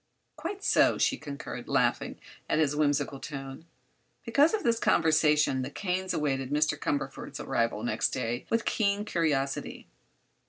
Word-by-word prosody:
"Quite 400 0 -6
so," - - +4
she - - +2
concurred, 145 -2 -7
laughing - - +1 0.3
at - - +2
his 150 -2 +2
whimsical 145 -2 0
tone. 135 +1 -7 0.6
Because 295 +3 +4
of 420 - -4
this 230 -1 +2
conversation 150 -6 +3
the 130 - -4
Kanes 185 +3 -2
awaited 135 -3 -1
Mr. 150 +2 +2
Cumberford's 145 - -3
arrival - - -1
next - - 0
day 120 +1 -3
with 230 0 +1
keen 205 -1 +1
curiosity. 145 -8 -1
150 Hz, 135 wpm, -29 LUFS, 140-190 Hz, 0.6 s, so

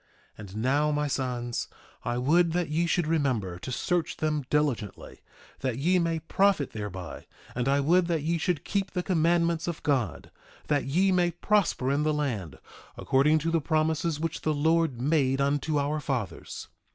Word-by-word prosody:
1:7 - - -24
And 100 -2 -9
now, 140 +6 +2
my 150 0 0
sons, 125 -4 -2 0.4
I 120 - -1
would 165 +6 +3
that 175 -2 0
ye 165 +3 +1
should 170 0 +1
remember 130 - 0
to 130 - -6
search 175 +6 -1
them 150 -2 -1
diligently, 135 -9 -2 0.4
that 130 -3 -2
ye 180 +7 +2
may 165 -1 0
profit 190 -3 +2
thereby; 95 -5 -7 0.3
and 125 +1 -2
I 140 +1 +3
would 170 +5 +3
that 165 -4 0
ye 165 +2 0
should 160 -2 -1
keep 200 -2 -1
the 180 - -1
commandments 170 -1 +1
of 170 -3 -4
God, 120 - -1 0.4
that 145 -2 +1
ye 180 +8 +2
may 180 -1 +3
prosper 175 -6 +1
in 140 +1 +1
the 155 0 +1
land 110 - -3 0.4
according 145 +4 +3
to 165 - +1
the 165 -1 +2
promises 155 0 0
which 165 0 -3
the 155 -1 0
Lord 160 -3 +2
made 135 -1 +2
unto 145 +2 +1
our 145 +2 0
fathers. 130 - -4
150 Hz, 175 wpm, -27 LUFS, 130-165 Hz, 0.4 s, would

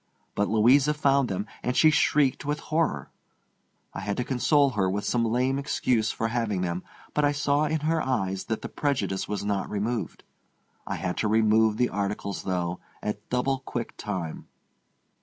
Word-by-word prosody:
But 105 - +1
Louisa 130 +7 +4
found 140 -3 +2
them, 95 +2 -2 0.2
and 125 - -1
she 155 - +6
shrieked 150 -2 +2
with 150 +1 -2
horror. 155 - -1 0.8
I - - -5
had 100 0 -3
to 125 - 0
console 140 +3 +3
her 95 -6 +1
with 100 +2 -2
some 120 +2 +1
lame 125 +4 +1
excuse 120 -5 +1
for 115 - -1
having 110 -5 -1
them, 90 0 -2 0.3
but 150 - +1
I 145 0 +3
saw 145 +1 +1
in 155 0 -1
her 160 +1 +1
eyes 95 -8 -1
that 110 - -3
the - - -3
prejudice 140 -9 -1
was 105 -1 -3
not 100 -1 -1
removed. 110 +3 -3 0.6
I - - -2
had 90 -1 -3
to 110 - +1
remove 110 0 +3
the 125 +1 +2
articles, 100 -1 -3
though, 90 -1 -2 0.2
at 105 0 -4
double 130 +2 0
quick 120 -3 -5
time. 90 -6 -5
115 Hz, 175 wpm, -27 LUFS, 100-140 Hz, 0.8 s, she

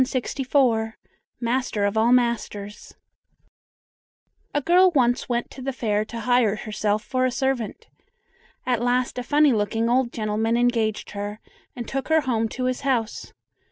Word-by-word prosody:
MASTER 235 -3 0
OF 200 +1 -1
ALL 225 +2 +3
MASTERS 225 -4 -1 1.6
A 290 - +1
girl 355 +5 +5
once 245 -1 +2
went 240 0 -1
to 265 - -10
the 270 +1 -2
fair 215 -5 0
to 230 +1 -7
hire 245 -3 +3
herself 215 0 -2
for 255 0 -1
a 255 - +3
servant. 265 - -2 0.8
At 245 -3 0
last 245 +1 0
a - - -4
funny 290 +1 +4
looking 225 +2 0
old 250 -1 +2
gentleman 220 +1 0
engaged 230 -3 0
her, 205 +1 -5 0.4
and 240 -2 -6
took 270 0 -3
her 315 0 +4
home 230 -5 0
to 255 - -5
his 255 +1 -1
house. 245 -5 -1
240 Hz, 145 wpm, -24 LUFS, 220-255 Hz, 1.6 s, girl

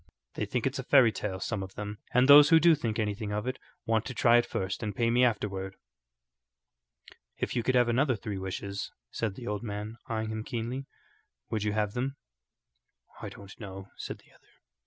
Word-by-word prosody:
They - - -2
think 125 -3 -1
it's 135 +1 -1
a - - -3
fairy 130 -3 +6
tale; 95 -3 -4
some 105 0 -2
of 95 0 -8
them, 105 0 -6
and 125 +1 +4
those 145 +1 +10
who 165 - +7
do 170 +1 +6
think 115 -8 -1
anything 105 -1 -2
of 105 +2 -2
it 130 +1 -3 0.3
want 110 -1 +2
to 130 - -6
try 120 0 +5
it 120 - +2
first 95 0 -3
and 105 -3 -3
pay 115 +1 +2
me 125 +2 +4
afterward." 95 -5 -1 1.6
"If - - -2
you 120 - +2
could 130 +2 +1
have 120 -1 +5
another 130 +2 +2
three 105 -2 -5
wishes," 100 +1 -4 0.2
said 110 -4 -2
the 120 - -8
old 105 -3 -2
man, 105 0 -5
eyeing 110 -1 -2
him 110 0 -3
keenly, 125 +3 -4 0.6
"would 110 - 0
you 105 0 0
have 105 -1 0
them?" 135 +3 -2 1.1
"I - - -5
don't 100 -1 -13
know," 95 -2 -8
said - - -6
the - - -24
other. - - -26
110 Hz, 200 wpm, -29 LUFS, 105-125 Hz, 1.6 s, those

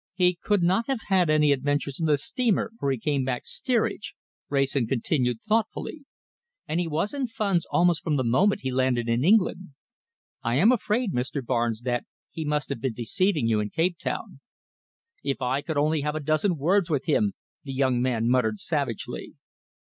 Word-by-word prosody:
"He 180 -2 +2
could 205 -4 +1
not 190 +6 +2
have 265 -4 -1
had 185 -4 +3
any 150 -1 +4
adventures 140 0 -1
on 165 - 0
the 150 -1 +4
steamer, 225 - 0
for 140 - 0
he 135 - 0
came 140 +3 0
back 125 -1 -3
steerage," 235 -4 -1 0.3
Wrayson 135 -3 +1
continued 125 -1 0
thoughtfully, 230 +7 -1 0.6
"and 160 - -1
he 175 - -1
was 165 - -1
in 275 -3 -1
funds 200 -7 0
almost 175 -4 +2
from 155 - 0
the 130 - +1
moment 175 - +2
he 130 - -2
landed 125 -2 +1
in 115 +2 +1
England. 185 -4 +2 0.7
I 115 +1 0
am 190 - +5
afraid, 230 -2 0
Mr. 130 +2 -2
Barnes, 120 -2 0
that 120 -1 -1 0.3
he 160 - -5
must 150 -2 -1
have 115 - -4
been 130 -2 -1
deceiving 150 - 0
you 110 -2 +2
in 105 0 -2
Cape 170 - 0
Town." - - -4 0.8
"If 140 -1 -1
I 130 +2 0
could 160 0 -4
only 155 +1 +2
have 150 +1 -2
a - - -1
dozen 155 +4 +1
words 175 +5 +2
with 145 -4 0
him!" 200 +6 +1 0.3
the 140 - -6
young 130 -2 +1
man 120 -3 0
muttered 120 -4 +2
savagely. 140 -5 -3
150 Hz, 185 wpm, -26 LUFS, 130-185 Hz, 0.8 s, am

